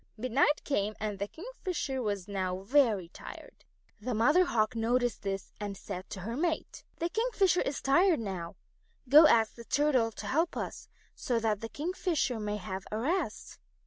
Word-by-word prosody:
Midnight 255 +6 +2
came 210 -6 -1
and 210 -2 -3
the 200 - -2
Kingfisher 345 - -4
was 205 -4 -2
now 185 -2 -2
very 220 -5 +3
tired. - - -11 0.4
The 245 +1 -2
Mother 300 +12 +5
Hawk 230 -7 +1
noticed 240 +1 +1
this 195 -1 -4
and 205 -2 -4
said 185 -1 -7
to 190 - -6
her 230 +6 -4
mate: 320 +3 -2
"The 335 - -2
Kingfisher 410 -5 +2
is 275 - -3
tired 305 - +4
out. 175 -3 -5 0.5
Go 300 +5 +9
and - - +9
ask 225 -5 +4
the 235 - -11
Turtle 260 -3 +2
to - - -8
help 325 +5 0
us - - -5 0.3
so 245 - -1
that 215 -2 0
the 225 - -5
Kingfisher 315 - -1
may 210 0 -2
have 190 -1 -6
a 215 - -1
rest." 295 - -2
235 Hz, 175 wpm, -30 LUFS, 205-300 Hz, 0.5 s, Go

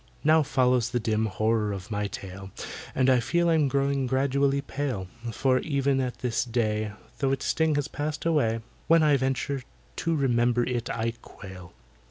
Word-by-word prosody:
Now 155 +1 +5
follows 125 -4 +2
the 120 - 0
dim 110 -1 0
horror 110 +1 0
of 100 +2 -6
my 105 0 -1
tale, 95 0 -8 0.5
And 130 0 +3
I 130 -1 +5
feel 170 +8 +1
I'm 160 -3 +3
growing 140 0 0
gradually 140 +1 +2
pale, 135 -8 -3 0.3
For, 130 +3 +2
even 140 -2 +1
at 125 -2 -4
this 125 -2 0
day, 110 -3 -1 0.3
Though 135 -2 +1
its 135 -1 -1
sting 160 -2 +2
has 145 0 0
passed 150 +1 -4
away, 115 -9 +2 0.3
When 165 -1 +5
I 150 -2 +5
venture 135 +1 -1 0.4
to 165 0 0
remember 120 -3 +2
it, 120 -1 -2
I 115 0 -1
quail! 95 -3 -11
130 Hz, 170 wpm, -27 LUFS, 115-140 Hz, 0.5 s, Now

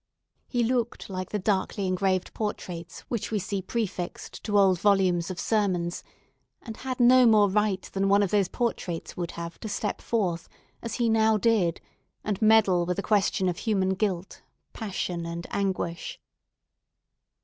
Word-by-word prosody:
He 245 -2 0
looked 240 -3 -1
like 185 -1 -4
the 210 - -1
darkly 195 0 0
engraved 185 0 0
portraits 180 -6 -5
which 235 -4 -4
we 220 - 0
see 200 0 -2
prefixed 190 -3 -4
to 205 -2 +1
old 190 -3 +4
volumes 185 -4 +3
of 185 -1 -5
sermons, 185 -6 0 0.6
and 225 - -7
had 260 -1 -4
no 250 +1 +7
more 215 -2 +6
right 200 -1 +1
than 195 0 +1
one 200 +1 +5
of 195 - -1
those 200 -3 +3
portraits 190 -8 -3
would 175 -2 -3
have 170 0 -6
to 220 - -6
step 210 0 -3
forth, 180 -8 -1 0.3
as 230 - -4
he 240 -2 +1
now 220 -1 +4
did, 210 -7 +2 0.4
and 205 -1 -2
meddle 215 -5 +5
with 180 - -1
a 200 - -2
question 195 -2 +2
of 175 -2 -1
human 195 -4 +1
guilt, 190 -2 -2 0.3
passion, 185 -5 -3
and 170 0 -5
anguish. 185 -4 -2
195 Hz, 160 wpm, -27 LUFS, 180-220 Hz, 0.6 s, no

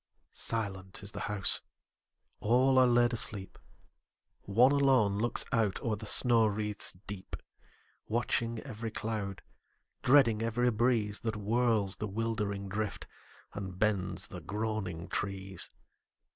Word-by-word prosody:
Silent 95 -4 -2
is 100 - -3
the - - -7
house: 105 -2 +5 0.8
all 130 +4 +4
are 130 - +6
laid 120 0 +3
asleep: 105 -4 -3 0.8
One 120 +7 +4
alone 130 -8 +3
looks 120 +2 +1
out 110 -4 +1
o'er 110 -2 0
the 105 +1 -8
snow 115 0 +4
wreaths 105 -1 -2
deep, 95 -2 -6 0.7
Watching 115 0 0
every 115 -4 -6
cloud, 105 -3 -4 0.6
dreading 120 -5 +5
every 120 +2 +1
breeze 110 -2 +1
That 110 -1 -3
whirls 110 -1 +1
the 105 - -3
wildering 105 -2 -2
drift, 105 +2 -3 0.5
and 95 -3 -6
bends 100 -2 -1
the - - -8
groaning 105 -5 -3
trees. 95 -1 -1
110 Hz, 120 wpm, -31 LUFS, 100-115 Hz, 0.8 s, are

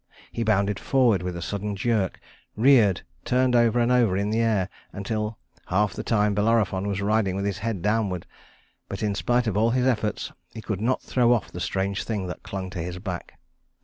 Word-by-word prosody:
He - - -4
bounded 105 -2 +1
forward 125 - +3
with 90 -1 -4
a 85 - -5
sudden 100 +1 -3
jerk, 105 -2 0 0.4
reared, 110 -5 +4 0.2
turned 125 0 +2
over 120 0 +4
and 120 +1 +2
over 115 -7 +3
in 100 +1 0
the 110 - +1
air, 110 -5 +2 0.2
until 105 +2 -3 0.3
half 105 +3 +1
the - - -5
time 105 -2 +2
Bellerophon 105 -2 +1
was 100 -1 -2
riding 105 -2 +1
with 100 +1 -2
his 100 -2 -2
head 110 -6 -3
downward; 105 -4 0 0.6
but 100 +2 -5
in 105 -1 +1
spite 120 +5 +1
of 110 -4 -1
all 110 +2 +3
his 125 +1 +1
efforts, 110 -5 0 0.2
he - - -5
could 105 -3 -3
not 125 +3 0
throw 120 -2 +2
off 120 - -1
the 90 - -7
strange 95 +2 -1
thing 105 -4 -3
that 90 - -6
clung 95 -1 -5
to 95 - -5
his 90 +2 -5
back. 90 -2 -6
105 Hz, 200 wpm, -25 LUFS, 95-115 Hz, 0.6 s, reared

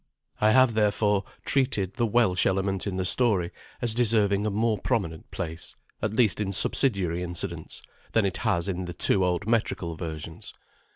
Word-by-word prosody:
I 105 - +3
have 130 +1 +4
therefore 105 -2 +1 0.2
treated 105 -9 0
the 120 0 0
Welsh 105 -5 +2
element 95 0 -1
in 95 -2 -3
the 95 - -1
story 95 -5 +3 0.3
as 120 -2 +2
deserving 105 -3 +2
a - - +1
more 110 +1 0
prominent 95 -10 -3
place, 80 0 -6 0.3
at 110 - -1
least 110 -4 +2
in 100 -1 -2
subsidiary 95 -6 +3
incidents, 90 -1 -5 0.3
than 115 -3 +3
it 95 - -1
has 85 +1 0
in 95 -1 -3
the 85 -1 -7
two 95 +1 +4
old 90 +2 -1
metrical 105 -7 -1
versions. 80 -1 -7
100 Hz, 165 wpm, -26 LUFS, 90-110 Hz, 0.3 s, have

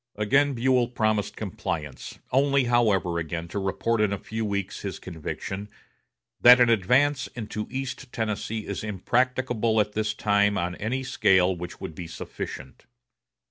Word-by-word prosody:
Again 135 +7 +2
Buell 125 0 +2
promised 110 -4 0
compliance, 75 -4 -5
only, 140 +1 +3
however, 105 -8 +2
again 85 +1 -4
to 100 - -3
report 105 +4 0
in 105 -2 +2
a 100 - -1
few 110 +3 -5
weeks 100 -2 -3
his 95 -2 -4
conviction 95 +4 -6 0.7
"that 125 +1 +9
an 120 -1 +5
advance 130 +7 +3
into 105 -2 -5
East 130 0 -5
Tennessee 110 -1 -3
is 100 - -4
impracticable 115 +2 0
at 105 0 +1
this 110 0 -1
time 105 -1 +2
on 90 +1 -1
any 125 +5 -2
scale 95 -7 +3
which 90 0 -8
would - - -6
be 85 +2 -7
sufficient." 70 -4 -8
105 Hz, 145 wpm, -26 LUFS, 95-125 Hz, 0.7 s, that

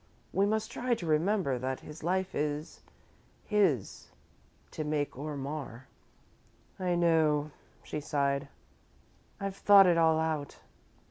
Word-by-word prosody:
We 195 +1 +3
must 220 +1 -1
try 245 -1 0
to 175 - -7
remember 160 -3 +1
that 130 +1 -3
his 150 +1 -11
life 190 +2 -1
is 150 +1 -3 0.6
his 190 - 0 0.6
to 155 - -4
make 150 -1 -2
or 145 +2 -5
mar." 135 -3 -6 0.9
"I 180 -1 0
know," 155 -3 +2 0.3
she 150 - -4
sighed, 140 -1 -1 0.9
"I've 195 -1 -4
thought 200 -1 +7
it 175 -2 +4
all 160 -1 +4
out." 155 -3 -2
155 Hz, 125 wpm, -30 LUFS, 145-185 Hz, 0.9 s, thought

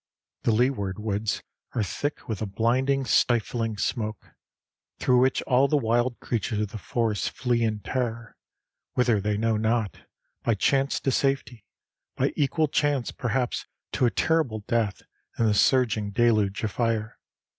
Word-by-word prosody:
The - - +2
leeward 110 -4 +1
woods 105 -1 -2 0.3
are 115 - +1
thick 145 +9 -4
with 110 -3 -3
a 110 - -1
blinding, 130 +7 +1
stifling 115 -2 +1
smoke, 110 0 -3 0.7
through 125 -1 +3
which 130 +1 +2
all 130 +1 +3
the 150 - +2
wild 120 0 +1
creatures 110 -2 -2
of 105 - -2
the 110 0 -7
forest 105 +2 -1
flee 120 -2 0
in 110 -2 0
terror, 115 +1 -3 0.6
whither 120 -5 +3
they 105 +1 0
know 110 0 +1
not 110 -1 -1 0.3
by 115 - +1
chance 135 +6 +1
to 135 - +1
safety, 130 -5 -1 0.5
by - - 0
equal 150 +2 +1
chance 145 -3 0
perhaps 125 0 -2 0.2
to 125 - +2
a - - +3
terrible 135 -7 0
death 110 -2 -1 0.3
in 115 - +2
the 110 - +3
surging 110 -2 +3
deluge 105 -2 +2
of 110 - -1
fire. 115 -2 -1
115 Hz, 150 wpm, -26 LUFS, 105-125 Hz, 0.7 s, through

